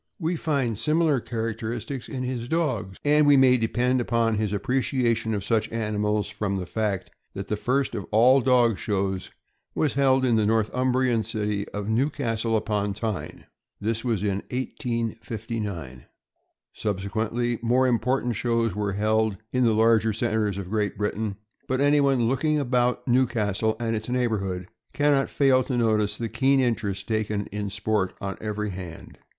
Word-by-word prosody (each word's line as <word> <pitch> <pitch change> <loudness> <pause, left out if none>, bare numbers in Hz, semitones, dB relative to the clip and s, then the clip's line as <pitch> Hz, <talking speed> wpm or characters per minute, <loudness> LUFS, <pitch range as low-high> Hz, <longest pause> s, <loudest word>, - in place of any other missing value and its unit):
* - - -44
We 165 -1 -1
naturally 170 - -3
find 135 -8 0
similar 155 +2 +2
characteristics 115 +3 -4
in 130 -2 -4
his 125 -2 -3
dogs, 130 - -1
and 150 0 +4
we 145 -1 +7
may 130 -1 +6
depend 125 +2 +1
upon 115 -1 +1
his 105 -1 -1
appreciation 115 0 0
of 100 - -3
such 110 0 0
animals 105 -2 -1
from 105 -1 -2
the 90 - -3
fact 95 -5 -2 0.2
that 100 0 -6
the 105 - +1
first 130 +6 0
of 100 -5 -5
all 125 +5 +5
dog 120 -4 +3
shows 95 -2 -2 0.5
was 150 - +1
held 135 -1 +3
in 120 -3 +3
the 110 - +2
Northumbrian 125 +2 +1
city 105 -2 -2
of 105 0 -5
Newcastle 115 -2 0
upon 105 -2 -1
Tyne. 110 -4 -4 0.3
This 115 +2 -1
was 115 -6 -1
in 100 -1 0
1859. 115 - -4 0.7
Subsequently, 110 +4 -2
more 125 +3 +3
important 125 0 +1
shows 115 -3 0
were 105 0 -2
held 110 0 +1 0.2
in 125 0 +2
the 115 - +4
larger 110 0 +3
centers 110 -3 0
of 95 -1 -6
Great 105 -2 -1
Britain; 105 0 -2 0.3
but 130 0 0
anyone 140 -4 +3
looking 150 +5 +1
about 125 -2 0
Newcastle 110 -4 +1
and 115 -1 -1
its 110 +2 -4
neighborhood 100 -8 -1 0.3
can 145 0 +3
not 135 -1 +2
fail 130 -2 +3
to 125 - -2
notice 110 -3 +1
the 115 - -3
keen 135 +4 +2
interest 105 -6 -1
taken 105 -2 -1
in 105 0 -3
sport 100 -1 -1
on 100 -1 -4
every 105 -1 -3
hand. 90 -3 -9
115 Hz, 160 wpm, -25 LUFS, 105-125 Hz, 0.7 s, we